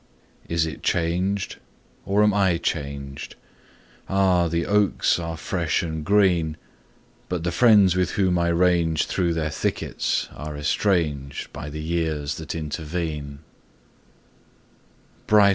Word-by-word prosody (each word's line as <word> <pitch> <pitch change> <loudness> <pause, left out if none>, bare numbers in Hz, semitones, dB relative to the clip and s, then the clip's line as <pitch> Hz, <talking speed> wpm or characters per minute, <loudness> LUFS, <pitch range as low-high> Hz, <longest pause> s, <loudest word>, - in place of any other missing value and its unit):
Is 85 -1 +1
it 80 - -6
changed, 90 +4 0 0.5
or 100 +2 +3
am 105 -1 +4
I 95 -4 +3
changed? 70 -4 -4 0.7
Ah! 95 -3 +3
the 85 +1 -1
oaks 105 -3 +2
are 80 -1 -4
fresh 85 0 -1
and 80 -2 -4
green, 90 -5 +2 0.7
But 90 -2 -2
the 85 - 0
friends 100 -2 +5
with 90 -2 0
whom 90 -3 +2
I 85 - +1
ranged 85 -2 +2
Through 85 -2 0
their 80 -2 -1
thickets - - -1
are 75 0 -7
estranged 75 -4 -1
By 75 - -6
the 75 +1 -6
years 80 -3 -1
that 80 0 -6
intervene. 75 -2 -4
85 Hz, 120 wpm, -24 LUFS, 75-90 Hz, 0.7 s, friends